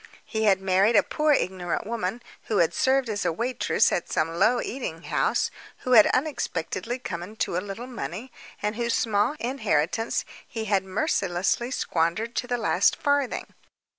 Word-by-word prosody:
He 220 Hz, -1 st, -1 dB
had 195 Hz, -2 st, +4 dB
married 190 Hz, +4 st, +3 dB
a 205 Hz, -, +6 dB
poor 305 Hz, 0 st, +1 dB
ignorant 185 Hz, -10 st, 0 dB
woman, 230 Hz, 0 st, -3 dB, 0.2 s
who 215 Hz, -, -1 dB
had 170 Hz, -, +3 dB
served 265 Hz, -1 st, +2 dB
as 210 Hz, -2 st, -2 dB
a -, -, +1 dB
waitress 240 Hz, +9 st, +1 dB
at -, -, -2 dB
some 165 Hz, +1 st, 0 dB
low 215 Hz, +8 st, +3 dB
eating 185 Hz, -12 st, -5 dB
house, -, -, +1 dB, 0.3 s
who 255 Hz, -, -3 dB
had 220 Hz, -4 st, +8 dB
unexpectedly 240 Hz, -, -2 dB
come 175 Hz, -9 st, -5 dB
into 195 Hz, 0 st, -3 dB
a 180 Hz, -, 0 dB
little 205 Hz, +4 st, -6 dB
money, 245 Hz, -1 st, -6 dB, 0.3 s
and 210 Hz, +1 st, 0 dB
whose 235 Hz, 0 st, 0 dB
small 220 Hz, +4 st, +1 dB
inheritance 225 Hz, -, 0 dB, 0.2 s
he 225 Hz, -2 st, -5 dB
had 200 Hz, -2 st, +2 dB
mercilessly 190 Hz, -, 0 dB
squandered 195 Hz, 0 st, -1 dB
to 245 Hz, -, -1 dB
the 245 Hz, 0 st, 0 dB
last 230 Hz, -, +3 dB
farthing. 285 Hz, -3 st, -1 dB
220 Hz, 165 wpm, -26 LUFS, 185-245 Hz, 0.3 s, had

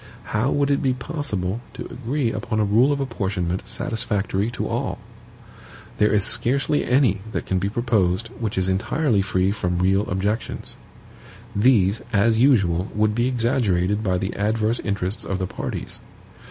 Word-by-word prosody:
How 110 Hz, +6 st, +2 dB
would 145 Hz, 0 st, +1 dB
it 140 Hz, -, +2 dB
be 130 Hz, -3 st, +1 dB
possible 120 Hz, -, -3 dB
to -, -, -6 dB
agree 125 Hz, 0 st, -2 dB
upon 110 Hz, -2 st, -2 dB
a 105 Hz, -, +3 dB
rule 115 Hz, +7 st, +4 dB
of 140 Hz, -, 0 dB
apportionment 95 Hz, -8 st, -2 dB
satisfactory 105 Hz, -1 st, -1 dB
to 120 Hz, -, -3 dB
all? -, -, -2 dB, 1.0 s
There 105 Hz, 0 st, +4 dB
is 105 Hz, -2 st, +3 dB
scarcely 135 Hz, +7 st, +1 dB
any 125 Hz, -7 st, +2 dB
that -, -, -2 dB
can 95 Hz, -, 0 dB
be 100 Hz, +2 st, -1 dB
proposed 110 Hz, -3 st, 0 dB
which 110 Hz, -4 st, -3 dB
is 95 Hz, 0 st, +1 dB
entirely 115 Hz, +4 st, +1 dB
free 95 Hz, -1 st, +1 dB
from 90 Hz, -4 st, -1 dB
real 95 Hz, +3 st, +2 dB
objections. 100 Hz, +4 st, -3 dB, 0.8 s
These, 105 Hz, -2 st, +3 dB
as 110 Hz, +1 st, +3 dB
usual, 100 Hz, -9 st, +3 dB
would 105 Hz, 0 st, +2 dB
be 120 Hz, +3 st, +1 dB
exaggerated 110 Hz, -6 st, +1 dB
by 95 Hz, -3 st, +1 dB
the 95 Hz, +2 st, -3 dB
adverse 110 Hz, +3 st, 0 dB
interest 100 Hz, 0 st, -2 dB
of 95 Hz, -, -2 dB
the 95 Hz, -, -2 dB
parties. -, -, -6 dB
105 Hz, 155 wpm, -23 LUFS, 95-120 Hz, 1.0 s, rule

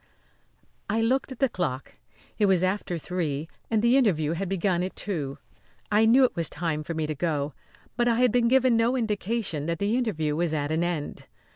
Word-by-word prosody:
I 220 Hz, +3 st, +1 dB
looked 255 Hz, +4 st, +1 dB
at 260 Hz, -, -7 dB
the 270 Hz, -, +3 dB
clock. 140 Hz, -, -4 dB, 0.5 s
It 205 Hz, -, +4 dB
was 185 Hz, -2 st, +3 dB
after 185 Hz, -2 st, -1 dB
three 160 Hz, -3 st, -3 dB, 0.2 s
and 220 Hz, -1 st, +1 dB
the 240 Hz, +3 st, +5 dB
interview 165 Hz, -, +2 dB
had 175 Hz, +3 st, -3 dB
begun 190 Hz, -2 st, 0 dB
at 185 Hz, +1 st, -4 dB
two. 150 Hz, -9 st, -4 dB, 0.5 s
I 215 Hz, +2 st, +4 dB
knew 255 Hz, +4 st, +6 dB
it 255 Hz, -, +2 dB
was 170 Hz, -3 st, -1 dB
time 155 Hz, -1 st, -2 dB
for 165 Hz, +2 st, -5 dB
me 160 Hz, -1 st, -1 dB
to 155 Hz, -, -2 dB
go, 150 Hz, -2 st, -2 dB, 0.4 s
but 240 Hz, 0 st, +2 dB
I 235 Hz, -, +3 dB
had 250 Hz, 0 st, +3 dB
been 240 Hz, 0 st, +3 dB
given 255 Hz, -1 st, +4 dB
no 230 Hz, +3 st, +2 dB
indication 210 Hz, -, -2 dB
that 170 Hz, 0 st, -1 dB
the 205 Hz, +5 st, 0 dB
interview 160 Hz, -12 st, -1 dB
was 165 Hz, -1 st, 0 dB
at 145 Hz, 0 st, -2 dB
an 160 Hz, +2 st, +1 dB
end. 170 Hz, -4 st, -4 dB
185 Hz, 205 wpm, -26 LUFS, 160-230 Hz, 0.5 s, knew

